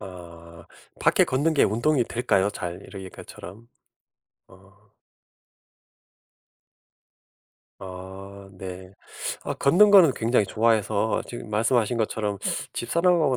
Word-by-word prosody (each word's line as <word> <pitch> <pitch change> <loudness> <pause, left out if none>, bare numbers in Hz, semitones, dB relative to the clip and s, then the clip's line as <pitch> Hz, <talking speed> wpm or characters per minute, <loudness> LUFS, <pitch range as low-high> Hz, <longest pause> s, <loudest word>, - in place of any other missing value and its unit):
아 85 -2 -12 0.3
밖에 - - +4
걷는 145 +5 0
게 145 - +4
운동이 125 +6 +1
될까요 110 -5 0
잘? 90 -2 -6
이러 95 - -10
이렇게처럼? 95 +3 -11 0.8
아. 95 +1 -20 3.0
아 95 +1 -10
네. 95 0 -9 0.5
아 - - -3
걷는 185 +9 +4
거는 185 -9 +7
굉장히 115 -3 +1
좋아해서 110 -1 +1
지금 120 -2 -9
말씀하신 115 +2 +1
것처럼 105 -2 -2 0.3
집사람하고 165 +1 +1
105 Hz, 220 characters per minute, -25 LUFS, 95-125 Hz, 3.0 s, 거는